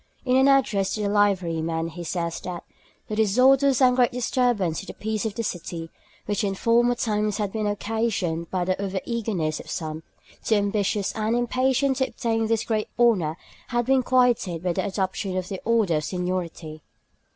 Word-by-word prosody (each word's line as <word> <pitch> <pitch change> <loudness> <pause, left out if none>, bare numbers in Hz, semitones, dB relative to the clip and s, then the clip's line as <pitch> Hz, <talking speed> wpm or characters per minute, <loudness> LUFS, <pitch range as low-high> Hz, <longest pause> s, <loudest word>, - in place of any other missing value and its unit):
In 255 0 +2
an 265 +1 +5
address 220 -8 +2
to 215 - -3
the 200 - 0
Liverymen 165 -5 +1
he 175 +2 -7
says 170 0 -3
that 180 -2 -6 0.4
'the 215 - -4
disorders 255 +5 +4
and 250 -1 +5
great 250 -2 +3
disturbance 240 -8 0
to 195 - -9
the - - -8
peace 220 0 -2
of 205 - -6
the 230 - -2
city, 170 -4 -5 0.3
which 205 0 -1
in 195 -1 -1
former 240 +3 +3
times 210 -3 -1
had 205 -2 -2
been 215 -1 -2
occasioned 205 -6 -1
by 180 -2 -1
the 185 +1 -1
over 195 -1 -2
eagerness 200 -10 -2
of - - -10
some, 155 -1 -4 0.4
too 220 - +2
ambitious 205 -1 0
and 220 +1 0
impatient 255 +2 +1
to 265 -1 +1
obtain 225 -2 -1
this 225 -1 +1
great 215 -2 -1
honour, 190 -10 +3 0.3
had 240 -1 0
been 265 +1 +3
quieted' 245 -10 +2
by 180 -1 0
the - - -1
adoption 190 -1 -2
of 185 -1 -3
the 190 - -5
order 220 -8 +2
of 150 - -2
seniority. 175 -3 -4
205 Hz, 185 wpm, -24 LUFS, 180-235 Hz, 0.4 s, an